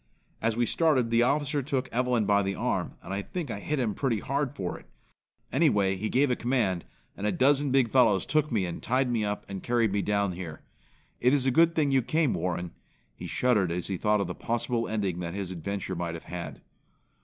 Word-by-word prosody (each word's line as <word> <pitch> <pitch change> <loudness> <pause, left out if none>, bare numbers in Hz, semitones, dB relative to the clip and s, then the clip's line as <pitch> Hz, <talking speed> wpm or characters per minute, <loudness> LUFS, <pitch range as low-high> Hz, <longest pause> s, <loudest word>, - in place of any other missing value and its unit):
As 115 0 0
we 120 - +3
started, 130 -6 +2
the 115 0 +4
officer 145 +3 +1
took 130 -1 -2
Evelyn 125 -2 +1
by 100 0 +3
the 95 0 -2
arm, - - -2
and 95 - -6
I 100 - -1
think 160 - -5
I 100 - -4
hit 150 +8 -2
him 120 -5 0
pretty 125 0 0
hard 140 +5 -2
for 90 -9 -4
it. - - -20 0.6
Anyway 105 - +3
he 105 +3 -3
gave 135 +1 +3
a - - +2
command, 115 -9 0 0.3
and 100 - -2
a - - +2
dozen 140 +2 +3
big 130 -4 +3
fellows 115 -7 +4
took 155 -1 +1
me 105 -5 +1
and 85 - -5
tied 130 +1 +1
me 115 -3 +1
up 105 0 -3
and 95 -1 -6
carried 120 -3 +1
me 100 0 +1
down 100 -2 +1
here. 85 -3 -7 0.6
It 125 +3 +4
is 135 -2 0
a 130 - +3
good 165 +5 +4
thing 150 -3 +2
you 135 -1 +4
came, 155 +3 +1
Warren." 90 -1 -2 0.4
He - - -8
shuddered 105 -9 +2
as 90 0 -2
he 95 - -1
thought 105 +3 +2
of - - 0
the 90 - -4
possible 115 +2 -1
ending 100 -5 -1
that 85 0 -4
his 95 -2 -4
adventure 95 +2 -4
might 85 -1 -3
have 80 - -8
had. 85 0 -7
115 Hz, 225 wpm, -28 LUFS, 95-130 Hz, 0.6 s, the